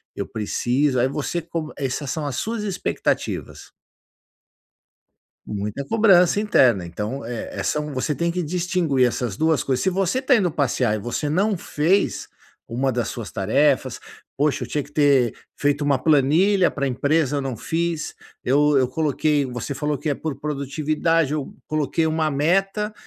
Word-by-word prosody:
eu - - -4
preciso", 125 +5 0
aí 125 - +3
você 150 +5 -3
co 160 -1 -5
essas 135 +1 -3
são 155 -2 -3
as 140 -4 -3
suas 225 -1 -3
expectativas. 195 -4 -2 1.8
Muita 105 +5 -4
cobrança 195 +1 +4
interna. 120 - +3
Então, 105 +9 -5
é 120 -1 -5
é - - -2
são 150 -1 -1
você 130 +4 0
tem 170 +3 -1
que 180 0 -2
distinguir 170 -5 +1
essas 120 -4 -3
2 160 -1 +1
coisas. 130 -2 0
Se 190 - +3
você 195 +6 0
está 265 -1 +3
indo 185 -6 +2
passear 125 -6 +1
e 110 - -3
você 120 +7 -3
não 195 +5 +1
fez 170 +5 0 0.4
uma 130 +3 0
das 120 -1 -1
suas 115 -4 -6
tarefas: 130 +5 +1 0.4
"Poxa, 145 0 +1
eu - - -6
tinha 150 - -2
que 145 - -17
ter 140 -5 +3 0.2
feito 145 0 0
uma 140 -2 +2
planilha 165 +7 +4
pra 140 -1 -3
empresa, 145 +3 +1
eu - - -1
não 130 -4 -4
fiz. 165 +3 -2 0.3
Eu 145 +2 +3
eu 130 -2 +3
coloquei", 150 0 +1
você 125 +3 -4
falou 150 +1 -2
que 155 - -3
é - - +2
por 140 -1 -5
produtividade: 150 +2 0
"Eu 150 -3 -3
coloquei 155 +1 0
uma 155 0 +1
meta, 195 +8 +1
150 Hz, 165 wpm, -22 LUFS, 130-165 Hz, 1.8 s, cobrança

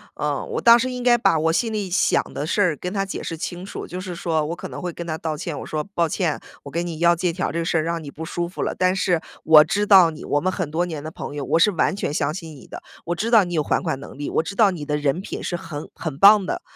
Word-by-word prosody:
呃 - - -2
“我 - - -3
当 235 0 +7
时 255 +2 -1
应 250 0 -5
该 245 -1 +4
把 165 -8 +2
我 160 +1 +2
心 225 +5 0
里 205 -3 -3
想 180 - +2
的 145 - -3
事 205 +6 0
儿 175 -5 +2
跟 180 +4 -5
他 195 0 -1
解 195 - -6
释 165 - -5
清 175 +3 -5
楚， 200 - -7
就 180 +1 -6
是 185 -2 -6
说， 165 -2 -1
我 165 - -3
可 - - -7
能 - - -8
会 180 -1 -3
跟 170 +1 -8
他 160 -1 -2
道 155 -2 -3
歉。 165 -2 -5
我 - - -6
说： 155 - -2
“抱 170 -2 +2
歉， 170 -4 -1 0.3
我 140 - -9
给 170 +1 -1
你 165 -2 -5
要 170 0 +4
借 175 +1 0
条 180 +3 -2
儿 - - -4
这 170 0 -1
事 165 - 0
儿 155 - +1
让 165 0 -3
你 140 - -8
不 160 - -7
舒 170 +1 -3
服 - - -7
了。 - - -2
但 185 0 +2
是 180 -3 +1 0.2
我 155 -1 +8
知 205 +5 0
道 185 -5 +7
你， 155 - -10
我 145 - 0
们 185 - 0
很 180 -4 -3
多 170 +3 0
年 160 -4 -5
的 155 - -6
朋 150 - -7
友， 140 - -4
我 - - +2
是 185 +5 +4
完 180 +2 +1
全 195 - -3
相 150 0 0
信 165 -2 -8
你 - - -15
的。 - - -9 0.2
我 175 - -1
知 220 +6 -2
道 220 -5 +6
你 175 - -6
有 155 -3 +1
还 - - 0
款 160 -7 -2
能 140 - -11
力， 145 - -4
我 - - +1
知 200 - -6
道 205 -3 +5
你 165 -5 -6
的 150 0 -1
人 145 +4 0
品 - - -6
是 175 - -3
很 150 -3 -7
很 150 -4 -5
棒 200 +1 +7
的， - - -3
170 Hz, 335 characters per minute, -22 LUFS, 155-190 Hz, 0.3 s, 我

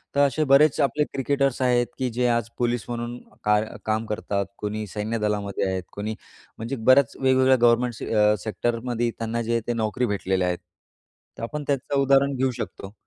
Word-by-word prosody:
तर - - +2
असे 155 +3 -1
बरेच 145 +1 +6
आपले 140 +2 +2
क्रिकेटर्स 135 -1 0
आहेत 120 -1 +3
की 130 -1 0
जे 125 +1 0
आज 115 -1 0
पोलीस 120 -1 0
म्हणून 120 0 -4 0.3
काय 105 +1 +2 0.2
काम 110 +1 0
करतात, 105 -2 -2
कोणी 105 +1 -3
सैन्यदलामध्ये 105 -1 -2
आहेत, 95 -1 -2
कोणी 105 +2 -4 0.4
म्हणजे 115 +5 -4
बऱ्याच 130 +2 +4
वेगवेगळ्या 130 0 +4
गव्हर्नमेंट 120 0 +2
अ, 105 0 +4
सेक्टरमध्ये 120 +2 -1
त्यांना 115 +1 -2
जे 115 0 0
ते 120 - +1
नोकरी 115 +2 -1
भेटलेल्या 95 -3 0
आहेत. 90 0 -1 0.8
तर - - -7
आपण 150 +5 -4
त्याचं 140 0 0
उदाहरण 140 0 +3
घेऊ 130 0 +1
शकतो. 100 -4 -7
120 Hz, 165 wpm, -24 LUFS, 105-130 Hz, 0.8 s, बरेच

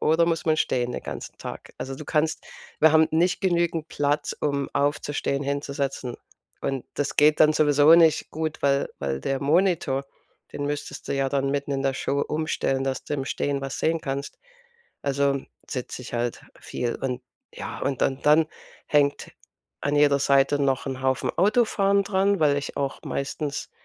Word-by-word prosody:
oder 165 +2 +3
muss 165 -2 0
man 155 -1 +2
stehen 125 -4 0
den - - -5
ganzen - - -7
Tag? - - -8
Also 135 0 -5
du 155 - -9
kannst 155 +1 0 0.4
wir 160 0 +7
haben 160 0 +6
nicht 175 +3 +2
genügend 170 -3 +1
Platz, 145 +1 0
um 140 -1 0
aufzustehen, 145 -1 0
hinzusetzen. 140 -3 -3 0.5
Und 135 -2 -2
das 145 0 -2
geht 150 +1 +5
dann 155 0 +7
sowieso 150 +1 +6
nicht 165 -2 +4
gut, 160 0 -3
weil 140 0 +2
weil 70 -1 -2
der 135 -1 -2
Monitor, 155 -3 +2 0.5
den 145 - -4
müsstest 145 0 -5
du - - 0
ja 135 0 +1
dann 135 0 0
mitten 140 0 -2
in 135 - -1
der 135 -1 +1
Show 140 +1 -1
umstellen, 150 -3 -1
dass 135 -1 -2
du 145 - -3
im 135 -2 -2
Stehen 140 0 -1
was 135 -1 -5
sehen 165 0 +1
kannst. 140 0 -4 0.6
Also 140 -1 +1 0.3
sitz 125 -2 -4
ich 125 - -9
halt 120 0 -2 0.2
viel. 120 -1 -3
Und 125 -1 -3 0.3
ja, - - -6
und 140 -2 -1
dann 135 0 +1
dann 155 +2 +5 0.4
hängt 145 -1 +1 0.5
an 145 +1 0
jeder 145 -1 +5
Seite 140 +1 +3
noch 135 -1 +1
'n 130 -1 -4
Haufen 130 0 +1
Autofahren 200 -1 +3
dran, 200 0 +2
weil 145 -2 +4
ich 145 - -4
auch 140 -1 -2
meistens 140 +1 -3
145 Hz, 175 wpm, -25 LUFS, 135-155 Hz, 0.6 s, wir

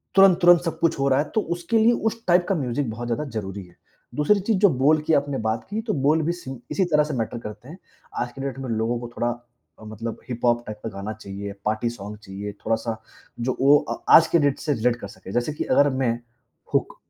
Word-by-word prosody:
तुरंत, 195 -2 +7
तुरंत 175 -1 +7
सब 165 -1 -3
कुछ 165 -4 +1
हो 140 - +2
रहा 130 0 +3
है, 150 - +1
तो 220 - +3
उसके 175 +6 -1
लिए 225 +2 +5 0.2
उस 230 +1 -11
टाइप 175 0 +4
का 195 - +2
म्यूज़िक 130 -3 -1
बहुत 120 +2 -5
ज़्यादा 120 +6 -1 0.2
ज़रूरी 95 -1 -6
है। 90 - -20 0.4
दूसरी 175 +8 +3
चीज़, 205 +2 0
जो 200 0 +6
बोल 150 +2 +3
की 160 - +3
आपने 140 -2 +1
बात 110 +1 -1
की, 215 +2 -2
तो 220 -1 -2
बोल 155 +3 +4
भी 165 - +1
सेम 135 -8 -7
इसी 190 - +2
तरह 150 -3 +3
से 150 0 -4
मैटर 115 -1 -2
करते 105 +3 -9
हैं। 170 - -10 0.4
आज 120 0 -2
की 135 - -9
डेट 135 -1 -4
में 130 -2 -5
लोगों 115 +1 0
को 120 - -6
थोड़ा 120 0 0 0.5
अ, - - -13
मतलब 110 +1 -6
हिप-हॉप 120 -1 0
टाइप 105 0 -7
का 115 - -3
गाना 100 +1 -6
चाहिए, 100 -1 -7
पार्टी 110 +2 0
सॉन्ग 105 -2 -8
चाहिए, 100 0 -7
थोड़ा 115 - +3
सा 115 -2 -2 0.5
जो 130 - 0
ओ 145 +2 +7 0.2
अ - - -4 0.2
आज 165 - +8
की 170 - +3
डेट 145 -2 +1
से 150 - 0
रिलेट 120 -1 +1
कर 120 - -8
सके। 95 - -11
जैसे 120 +6 -1
कि - - -3
अगर 145 0 +4
मैं 125 -3 +2 0.6
हुक - - 0
130 Hz, 245 wpm, -24 LUFS, 110-160 Hz, 0.6 s, आज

